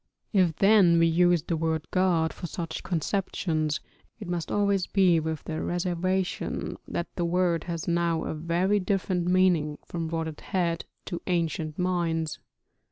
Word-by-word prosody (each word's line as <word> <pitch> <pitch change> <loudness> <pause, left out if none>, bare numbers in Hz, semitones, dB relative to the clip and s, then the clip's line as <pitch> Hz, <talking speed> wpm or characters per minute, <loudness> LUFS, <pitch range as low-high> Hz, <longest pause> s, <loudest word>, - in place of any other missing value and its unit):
If 180 -5 +3
then 195 -4 +5
we 165 - +5
use 175 0 +3
the 170 - -1
word 160 -1 -1
god 175 -4 +2
for 175 - -6
such 165 -1 -5
conceptions, 160 -3 -1 0.4
it 205 - -7
must 175 -2 -3
always 200 -2 +1
be 185 -4 +4
with 160 -1 -3
the 160 -1 -4
reservation 180 +1 -1
that 170 - -4
the 175 - -1
word 175 -1 +1
has 170 -2 -4
now 170 -1 +1
a - - -3
very 170 +6 +1
different 185 -2 0
meaning 180 -5 +3
from 165 -2 -4
what 165 0 -2
it 155 -2 -8
had 170 -3 -1 0.2
to 175 - -5
ancient 165 -3 -1
minds. 170 -3 -1
170 Hz, 155 wpm, -27 LUFS, 165-185 Hz, 0.4 s, then